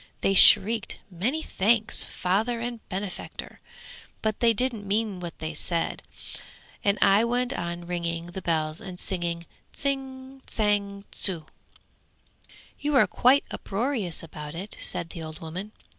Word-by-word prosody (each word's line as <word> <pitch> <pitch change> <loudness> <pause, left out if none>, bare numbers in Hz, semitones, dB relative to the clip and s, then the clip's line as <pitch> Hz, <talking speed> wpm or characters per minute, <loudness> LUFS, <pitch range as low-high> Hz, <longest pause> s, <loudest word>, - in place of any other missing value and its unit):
They 195 - +2
shrieked 215 +3 +8
"Many 245 - -2
thanks, 220 +3 +1
Father 215 +6 -1
and 240 0 -4
benefactor," 190 -1 -6 0.6
but 220 -1 -1
they 235 -1 +4
didn't 225 -3 -2
mean 205 -1 -1
what 170 -2 -7
they 160 0 -5
said, 165 +2 -2 0.8
and 200 0 +2
I 200 +2 +5
went 245 +2 0
on 170 -6 -5
ringing 170 -1 -3
the 190 - -6
bells 155 -1 -1
and 185 -4 -8
singing 170 -2 -2 0.3
"Tsing, 270 -1 -4
tsang, 200 -2 -1
tsu!"' 170 -5 +1 1.3
'You're 285 -2 +3
quite 265 +3 +3
uproarious 210 - -3
about 150 -1 -9
it!' 195 +5 -7
said 175 -2 -4
the 165 - -8
old 155 0 -8
woman. 180 +6 -7
200 Hz, 130 wpm, -26 LUFS, 170-235 Hz, 1.3 s, shrieked